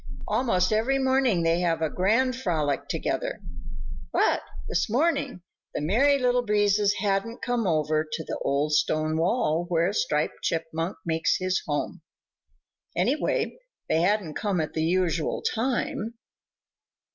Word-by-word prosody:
Almost 185 -6 +1
every 235 +6 +2
morning 260 -8 +2
they 165 +1 +2
have 165 -2 0
a - - +3
grand 230 +7 +2
frolic 160 - -1
together. - - -2 0.7
But - - +2 0.3
this 180 - 0
morning 275 - 0 0.3
the - - -1
Merry 255 - +3
Little 250 -1 +2
Breezes 205 -2 +2
hadn't 205 +3 -1
come 245 -4 0
over 155 -1 +1
to 160 - -3
the - - -5
old 145 +2 0
stone 155 +1 +1
wall 170 -1 +1
where 170 +2 +1
Striped 150 -7 -1
Chipmunk 165 +2 -2
makes 160 0 +1
his 185 0 0
home. - - -2 1.0
Anyway, - - 0 0.3
they 160 - +3
hadn't 190 -3 +1
come 200 -1 -1
at 155 - -2
the 160 - -1
usual 170 -1 0
time. 230 -1 -1
185 Hz, 135 wpm, -26 LUFS, 160-230 Hz, 1.0 s, a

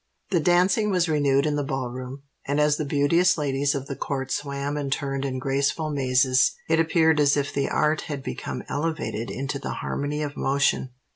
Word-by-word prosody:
The 175 - +3
dancing 180 +6 +3
was 180 -3 +2
renewed 145 -2 +2
in 150 -1 0
the 145 - 0
Ball 135 -2 -3
Room: 130 +2 -7 0.2
and 140 +1 0
as 150 0 +3
the 155 - -2
beauteous 165 +6 +3
ladies 140 -1 0
of 135 -1 -3
the 135 - -5
court 135 -1 -3
swam 140 0 -2
and 145 -2 -3
turned 135 -1 -2
in 130 -1 -2
graceful 140 +4 0
mazes, 130 -2 +3
it - - +2
appeared 160 -1 +3
as 145 0 +4
if 145 0 -1
the 140 - 0
art 150 +1 +1
had 140 -3 -4
become 125 - -5
elevated 150 -7 -3
into 140 +1 -4
the - - -4
harmony 145 +1 -2
of 145 -1 -5
motion. 135 -1 +1
140 Hz, 195 wpm, -25 LUFS, 135-150 Hz, 0.2 s, as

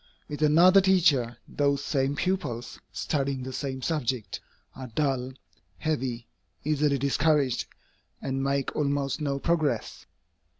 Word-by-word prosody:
With 150 0 -6
another 175 +6 +6
teacher, 165 -11 +3
those 140 -1 0
same 140 -1 0
pupils, 170 -8 -2
studying 140 -3 -2
the 130 0 -6
same 130 -1 -4
subject, 130 -8 -2 0.4
are 130 -1 -7
dull, 130 0 -1 0.4
heavy, 125 - -2 0.4
easily 150 -1 +2
discouraged, 140 -1 +1 0.5
and 135 0 -2
make 140 0 -1
almost 140 0 0
no 140 -2 -1
progress. 150 -6 -1
140 Hz, 115 wpm, -27 LUFS, 130-155 Hz, 0.5 s, another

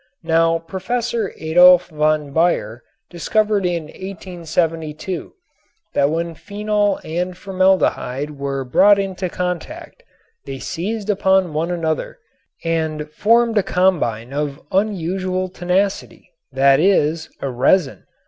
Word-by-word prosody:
Now 165 0 +3
Prof. 190 +9 -3
Adolf 180 -4 +4
von 150 -2 0
Baeyer 135 -9 +1 0.3
discovered 205 +3 +1
in 170 -2 -2
1872 165 -1 -4 0.6
that 140 - +2
when 165 +2 -2
phenol 205 +3 -1
and 180 +3 -3
formaldehyde 185 -8 0
were 140 -2 -4
brought 195 +11 +5
into 190 -2 -3
contact 180 -1 -5 0.5
they 135 -1 -5
seized 210 +9 -3
upon 190 -4 +2
one 160 +3 -1
another 165 - -2 0.5
and 160 -2 -2
formed 230 +4 +3
a - - +3
combine 155 - 0
of 145 -1 -3
unusual 185 -1 -1
tenacity, 180 +1 -2 0.2
that 135 +1 +4
is, 160 -3 +2
a 135 - -3
resin. 135 +5 +1
175 Hz, 110 wpm, -19 LUFS, 155-190 Hz, 0.6 s, brought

